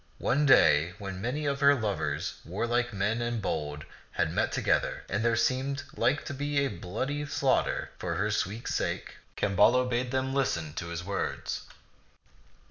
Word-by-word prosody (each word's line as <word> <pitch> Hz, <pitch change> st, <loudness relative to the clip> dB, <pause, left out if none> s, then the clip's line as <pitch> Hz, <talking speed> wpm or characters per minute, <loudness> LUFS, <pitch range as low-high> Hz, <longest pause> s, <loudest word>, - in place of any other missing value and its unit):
One 145 Hz, +3 st, +2 dB
day 85 Hz, -, +6 dB
when 95 Hz, -2 st, -6 dB
many 135 Hz, +7 st, -2 dB
of 140 Hz, -1 st, 0 dB
her 140 Hz, 0 st, +6 dB
lovers, 110 Hz, -6 st, -2 dB
warlike 120 Hz, +7 st, -1 dB
men 105 Hz, +3 st, 0 dB
and 120 Hz, -1 st, -1 dB
bold, 75 Hz, -6 st, -3 dB, 0.3 s
had -, -, 0 dB
met -, -, +1 dB
together, -, -, 0 dB
and 100 Hz, +4 st, -1 dB
there 115 Hz, 0 st, +3 dB
seemed 130 Hz, +4 st, 0 dB
like 145 Hz, -, +1 dB
to -, -, -4 dB
be 145 Hz, +1 st, 0 dB
a -, -, 0 dB
bloody 130 Hz, +12 st, -3 dB
slaughter -, -, +1 dB
for 85 Hz, -2 st, -2 dB
her 105 Hz, +5 st, 0 dB
sweet 105 Hz, +3 st, -2 dB
sake, -, -, -2 dB, 0.2 s
Camballo 105 Hz, +6 st, +4 dB
bade 125 Hz, 0 st, -1 dB
them 130 Hz, +1 st, -1 dB
listen 85 Hz, -, 0 dB
to 85 Hz, -, -5 dB
his 85 Hz, +1 st, -4 dB
words. 100 Hz, +1 st, -3 dB
115 Hz, 160 wpm, -29 LUFS, 95-135 Hz, 0.3 s, day